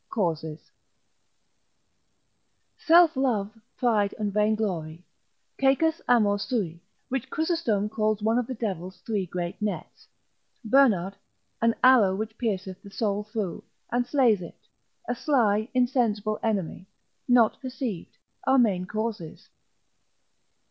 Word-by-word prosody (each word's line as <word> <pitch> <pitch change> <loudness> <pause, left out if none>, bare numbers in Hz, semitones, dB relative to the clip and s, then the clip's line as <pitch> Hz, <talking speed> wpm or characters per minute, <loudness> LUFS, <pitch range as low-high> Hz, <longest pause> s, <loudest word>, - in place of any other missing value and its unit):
Causes_. 160 -6 -3 2.0
Self 335 -1 +5
love, 235 -6 0 0.2
pride, 215 -5 +1
and 210 -2 -2
vainglory, 195 -6 -1 0.5
caecus 295 +5 +2
amor 210 -4 +3
sui, 200 -6 -3 0.3
which 265 -2 -3
Chrysostom 315 - 0
calls 215 -1 -1
one 225 +2 +2
of 245 - -3
the 255 - -4
devil's 190 -5 -4
three 205 -5 -2
great 175 +3 -5
nets; 210 -1 -5 0.6
Bernard, 215 -7 +3 0.4
an 230 0 +3
arrow 235 -7 +6
which 220 +2 -4
pierceth 190 -5 -3
the 200 - -12
soul 205 0 -2
through, 210 -5 -4 0.3
and 245 +1 0
slays 245 -7 +3
it; 170 - -11 0.4
a - - 0
sly, 230 -5 +1
insensible 230 -5 +1
enemy, 195 -4 -2 0.4
not 245 -2 +4
perceived, 255 -8 -5 0.3
are 265 0 +5
main 200 -7 +2
causes. 215 -6 -5
215 Hz, 115 wpm, -26 LUFS, 195-245 Hz, 2.0 s, arrow